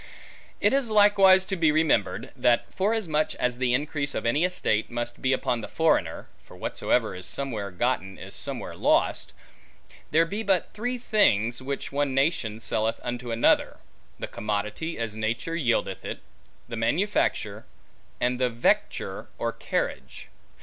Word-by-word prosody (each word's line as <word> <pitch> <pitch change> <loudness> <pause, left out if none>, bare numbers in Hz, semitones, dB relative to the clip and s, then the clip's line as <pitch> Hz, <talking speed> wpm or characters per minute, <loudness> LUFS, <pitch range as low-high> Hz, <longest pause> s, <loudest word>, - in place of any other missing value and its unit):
It - - +3
is 270 -4 +1
likewise 200 -3 +6
to 190 - -2
be 165 -4 +3
remembered, 155 0 +1
that 120 -1 +2
forasmuch 185 -7 0
as 125 -1 -1
the 125 -1 +2
increase 145 0 -2
of - - -3
any 140 +8 +2
estate 180 -12 0
must 120 0 -4
be 130 - +2
upon 125 -3 0
the - - -6
foreigner 160 0 +1
(for - - -15
whatsoever - - 0
is 90 0 -4
somewhere 115 -8 -3
gotten, 95 -1 -1
is - - -9
somewhere - - -4
lost), - - +1 0.8
there 165 +3 +4
be 200 +6 -4
but 195 -5 +1
three 245 +4 -2
things, 120 - +2
which 140 +1 -4
one 140 -1 0
nation 135 -7 +1
selleth 110 0 -1
unto 120 0 -4
another; 115 +1 +2 0.4
the - - -4
commodity 105 +10 -3
as 115 -2 -3
nature 115 +9 -2
yieldeth 125 -8 0
it; - - -6 0.5
the 115 - -5
manufacture; 155 - 0 0.5
and 125 0 0
the 125 -1 +2
vecture, 115 0 0
or - - -1
carriage. 65 -2 -4
130 Hz, 150 wpm, -26 LUFS, 115-170 Hz, 0.8 s, likewise